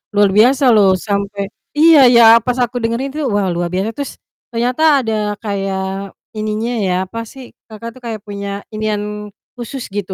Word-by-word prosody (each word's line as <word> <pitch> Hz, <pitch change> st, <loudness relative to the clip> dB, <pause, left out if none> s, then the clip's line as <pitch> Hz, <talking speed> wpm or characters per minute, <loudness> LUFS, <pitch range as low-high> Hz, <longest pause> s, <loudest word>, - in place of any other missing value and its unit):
luar 205 Hz, -1 st, +4 dB
biasa 255 Hz, +6 st, +4 dB
loh 195 Hz, -3 st, +4 dB
sampai 200 Hz, 0 st, -3 dB, 0.3 s
iya 320 Hz, -1 st, +7 dB, 0.2 s
ya, 235 Hz, -, +7 dB, 0.2 s
pas 250 Hz, 0 st, -1 dB
aku 245 Hz, 0 st, -1 dB
dengerin 240 Hz, +5 st, -2 dB
tuh, 300 Hz, -4 st, -2 dB
wah 205 Hz, -2 st, 0 dB
luar 175 Hz, 0 st, -2 dB
biasa. 190 Hz, +4 st, -2 dB
Terus, 285 Hz, +2 st, -6 dB, 0.3 s
ternyata 245 Hz, +5 st, -2 dB, 0.2 s
ada 225 Hz, -2 st, -2 dB, 0.3 s
kayak 195 Hz, -1 st, -4 dB, 0.2 s
ininya 215 Hz, +2 st, -2 dB
ya, 180 Hz, -, 0 dB
apa 230 Hz, +5 st, -7 dB
sih, 260 Hz, -2 st, -12 dB, 0.2 s
Kakak 220 Hz, +2 st, -8 dB
tuh 255 Hz, -, -15 dB
kayak 220 Hz, -3 st, -5 dB
punya 200 Hz, 0 st, -6 dB
inian 210 Hz, -1 st, -3 dB, 0.2 s
khusus 245 Hz, +2 st, -7 dB
gitu 200 Hz, -2 st, -4 dB
215 Hz, 165 wpm, -16 LUFS, 200-245 Hz, 0.3 s, iya